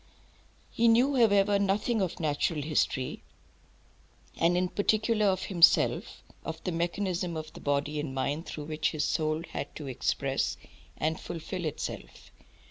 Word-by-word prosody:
He 235 - +2
knew, 250 +5 +4
however, 205 -4 +4
nothing 205 +3 +1
of 180 -1 -2
natural 155 0 0
history, 145 -3 -1 1.1
and 170 +2 +2
in 180 0 +1
particular 215 +2 +2
of 190 -1 +1
himself, 175 -4 +3 0.2
of 160 0 -5
the 180 - -1
mechanism 175 0 -1
of 155 0 -7
the - - -11
body 145 +1 0
and 145 -2 -3
mind, 145 +5 -2
through 150 - -6
which 155 0 -1
his 150 -2 -1
soul 155 0 0
had - - -5
to 150 - -7
express 130 -3 -1 0.4
and 160 +1 -1
fulfil 175 +1 -5
itself. 155 - -6
170 Hz, 140 wpm, -29 LUFS, 155-200 Hz, 1.1 s, knew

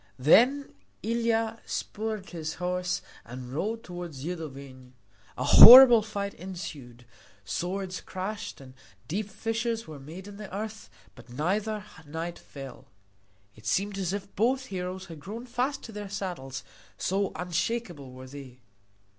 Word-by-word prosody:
Then 250 - +4 0.3
Ilia 230 0 0
spurred 215 -2 -4
his 160 -2 -4
horse 180 0 -2 0.2
and 125 +1 -9
rode 220 +9 -2
toward 175 -3 -7
Zidovin. 135 -4 -7 0.4
A - - -2
horrible 245 -1 +11
fight 200 -2 -4
ensued. 145 -10 -8 0.4
Swords 185 - -3
clashed 200 +3 -5
and 130 -1 -13 0.3
deep 205 +5 -3
fissures 225 +2 -2
were 155 -2 -9
made 165 +8 -10
in 205 -1 -10
the 210 -2 -9
earth, 215 +3 -6 0.2
but 120 - -16
neither 205 - -1 0.2
knight 165 +3 -5
fell. 135 -3 -11 0.7
It 110 +1 -12
seemed 195 - 0
as 185 -2 -1
if 200 0 -6
both 255 +5 +1
heroes 185 +1 -4
had 165 -3 -10
grown 215 +10 -7
fast 255 +3 -2
to 230 - -8
their 205 -2 -7
saddles, 170 -10 -5 0.3
so 195 +1 0
unshakeable 175 - -3
were 130 +1 -10
they. 130 -2 -10
185 Hz, 135 wpm, -28 LUFS, 150-215 Hz, 0.7 s, horrible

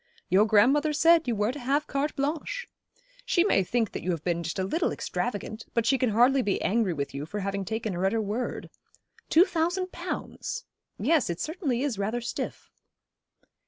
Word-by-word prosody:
'Your 205 +4 +5
grandmother 275 +9 +4
said 325 +1 +5
you 235 - +1
were 210 +2 +1
to 290 - -7
have 280 +4 0
carte 285 +1 -2
blanche. 310 - -2 0.6
She 350 -8 +3
may 280 - +3
think 225 +3 0
that - - -5
you 185 - -4
have 165 -4 -1
been 170 -1 0
just 165 -1 -4
a 190 - 0
little 315 - 0
extravagant; 220 -1 -4
but 230 -1 +2
she 260 +3 +3
can 255 - +2
hardly 245 +5 +4
be 205 -5 0
angry 215 -1 +2
with 140 -4 -3
you 140 +2 -5
for 210 +4 -4
having 195 0 -2
taken 220 0 -3
her 175 +1 -2
at - - +1
her 225 - +1
word. 220 +4 -3 0.6
Two 335 +4 +6
thousand 360 +1 -1
pounds! - - -5 0.3
Yes, 320 - +2
it 170 - -3
certainly 300 -7 -1
is 255 -8 -2
rather 215 +4 -1
stiff.' 235 - -5
235 Hz, 195 wpm, -27 LUFS, 200-295 Hz, 0.6 s, Two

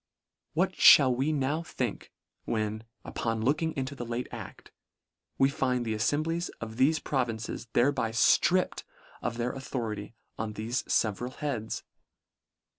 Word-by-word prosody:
What - - +2 0.2
mall 130 -2 +2
we 135 +5 +1
now 145 +2 0
think, 125 -9 -4 0.3
when, 110 0 -2 0.2
upon 115 -1 -2
looking 155 +6 +1
into 135 +1 -2
the 130 - -6
late 120 +1 -3
act, - - -9 0.7
we 135 - +5
find 125 -3 0
the 110 - -1
afTem 145 +8 +1
blies 165 +2 -2
of 110 0 -7
thefe 150 +5 +3
provinces 120 -3 -2
thereby 125 -2 +2
ftript 115 - +3 0.4
of 115 - -3
their 120 +1 -1
authority 115 -5 -5 0.2
on 110 -1 -3
thefe 115 +4 -2
feveral 115 +4 0
heads 125 -7 -3
125 Hz, 135 wpm, -29 LUFS, 110-140 Hz, 0.7 s, we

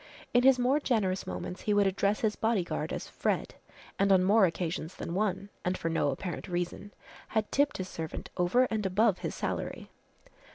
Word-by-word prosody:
In 245 - +5
his 265 0 +6
more 255 +4 +3
generous 205 -9 0
moments 180 - -5
he 210 - +1
would 205 -1 +4
address 200 +2 +1
his 215 -2 +1
bodyguard 220 -6 -1
as - - -4
"Fred," - - -1 0.5
and 195 0 +3
on 185 -1 +5
more 200 +1 +5
occasions 170 0 -3
than 170 - -5
one, 195 0 -1
and 180 +1 0
for 165 - -2
no 165 -3 +1
apparent 165 +5 -4
reason, 175 +3 -3 0.4
had 220 -1 -1
tipped 285 +1 +2
his 185 - -4
servant 160 -3 -6
over 180 +9 +3
and 215 -1 0
above 195 +1 +2
his - - -4
salary. - - -4
195 Hz, 180 wpm, -30 LUFS, 180-220 Hz, 0.5 s, his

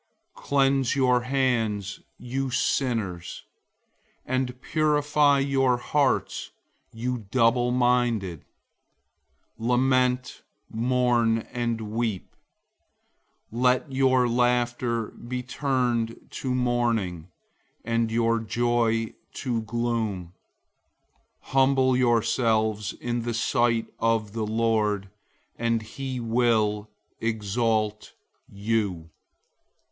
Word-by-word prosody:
Cleanse 135 -2 +1
your 125 -2 +3
hands, 115 -7 0 0.2
you 135 +2 -3
sinners; 110 -9 -1 0.8
and 130 -1 -2
purify 150 -1 +2
your 135 -2 +2
hearts, 140 +2 0 0.4
you 120 -2 -4
double 120 0 +3
minded. 120 -8 +1 1.2
004:009 115 - -3
Lament, 125 0 +1 0.3
mourn, 120 -1 +2 0.2
and 120 -2 -1
weep. 110 -4 -3 1.2
Let 125 +4 +1
your 130 -1 +3
laughter 120 -1 +1
be 125 +1 -6
turned 125 -3 -1
to 130 -2 -3
mourning, 115 -9 0 0.6
and 115 0 +1
your 115 0 +2
joy 115 0 0 0.2
to 120 -4 -2
gloom. 110 -6 -2 1.1
004:010 - - -19
Humble 130 -1 +3
yourselves 110 -3 +1
in 120 0 -3
the 120 0 -3
sight 115 0 +1
of 115 -2 0
the 110 -2 -2
Lord, 105 -3 0 0.5
and 115 -1 0
he 130 +3 -5
will 110 -3 +1 0.3
exalt 110 -1 -1 0.3
you. 100 -5 -2
120 Hz, 85 wpm, -26 LUFS, 110-125 Hz, 1.2 s, your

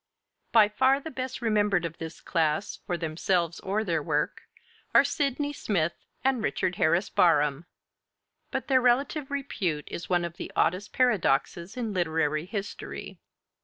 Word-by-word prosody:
BARHAM] 215 -3 +6
By - - -27
far 265 +3 +4
the 320 +3 -7
best 255 -1 -5
remembered 205 -5 +2
of 165 -1 -6
this 160 0 -7
class, 160 +2 0
for 175 - -1
themselves 170 +1 0
or 205 +3 -1
their 165 -6 0
work, 150 -1 -1 0.5
are - - +9
Sydney 290 0 -1
Smith 170 - 0 0.3
and 260 -3 +2
Richard 180 -4 -1
Harris 170 +5 +2
Barham; 150 -2 +3 0.8
but - - -3
their 260 -2 +4
relative 270 +4 +1
repute 185 - -2
is 175 - -6
one 175 -1 +2
of 170 +1 -7
the - - -6
oddest 190 +4 +1
paradoxes 195 - +1
in 230 -4 -2
literary 160 -3 0
history. 205 0 -6
185 Hz, 150 wpm, -27 LUFS, 165-245 Hz, 0.8 s, are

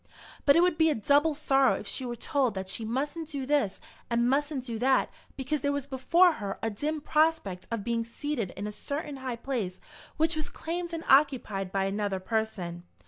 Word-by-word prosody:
But 280 - +7
it 335 - +6
would 355 -3 +2
be 320 0 +5
a 305 - +1
double 285 +7 +3
sorrow 275 -3 +3
if - - -6
she 255 - -2
were 240 - -3
told 255 -2 0
that 190 0 -4
she 225 - -4
mustn't 290 +8 -3
do 280 -4 -3
this 280 -8 +1 0.3
and 235 0 +2
mustn't 280 0 0
do 230 -3 -4
that 260 +2 +3 0.3
because 275 +2 -2
there 285 - +1
was 285 -2 -2
before 325 +7 +4
her 200 -1 -3
a 225 - 0
dim 300 +8 -2
prospect 300 - +1
of 230 -3 -3
being 230 +1 0
seated 230 -2 -3
in 200 - -4
a 210 - -3
certain 285 +5 -5
high 260 -2 -4
place 230 -7 -3 0.4
which 320 +2 +2
was 310 -1 -2
claimed 345 +1 -4
and 330 -1 -4
occupied 250 -9 +3
by 195 0 +1
another 200 -1 -1
person. 185 -4 -2
265 Hz, 200 wpm, -29 LUFS, 220-295 Hz, 0.4 s, But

